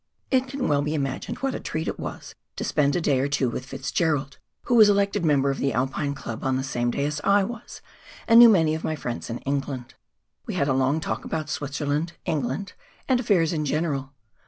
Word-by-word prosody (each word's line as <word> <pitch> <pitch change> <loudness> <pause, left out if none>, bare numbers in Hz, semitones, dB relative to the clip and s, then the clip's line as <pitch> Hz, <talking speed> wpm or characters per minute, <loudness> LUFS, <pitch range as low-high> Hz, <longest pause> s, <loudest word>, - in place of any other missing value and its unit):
It 260 -1 +2
can 270 0 -3
well 145 -1 +2
be 150 +2 -1
imagined 135 -3 -3
what 270 -1 0
a - - -4
treat 160 +1 -4
it - - -3
was - - -7 0.2
to - - -4
spend 140 -1 +1
a 175 - +1
day 140 -5 +2
or 135 - +1
two 140 -3 0
with 130 +2 -5
Fitzgerald, 140 +1 -1 0.2
who - - -1
was 220 -3 +8
elected 200 -1 +2
member 140 -3 +3
of 135 - -4
the 135 - 0
Alpine 135 +4 -1
Club 115 -4 -7
on 130 -1 +1
the 130 - -2
same 120 -3 -1
day 140 +4 -1
as 145 0 -2
I 200 0 +4
was, 235 +3 -8 0.4
and 230 0 +8
knew 240 -1 +10
many 165 -7 +4
of 160 - -4
my 155 - -1
friends 120 -5 -5
in 115 - -3
England, 135 -2 -3 0.5
We 215 - -3
had 140 -5 +1
a 135 - +2
long 135 +4 +1
talk - - -3
about 155 -2 -4
Switzerland, 145 +3 -2
England, 145 +5 -2 0.3
and 255 -2 +3
affairs 180 -9 +2
in 155 -2 -1
general. 145 -2 -2
145 Hz, 220 wpm, -25 LUFS, 135-175 Hz, 0.5 s, knew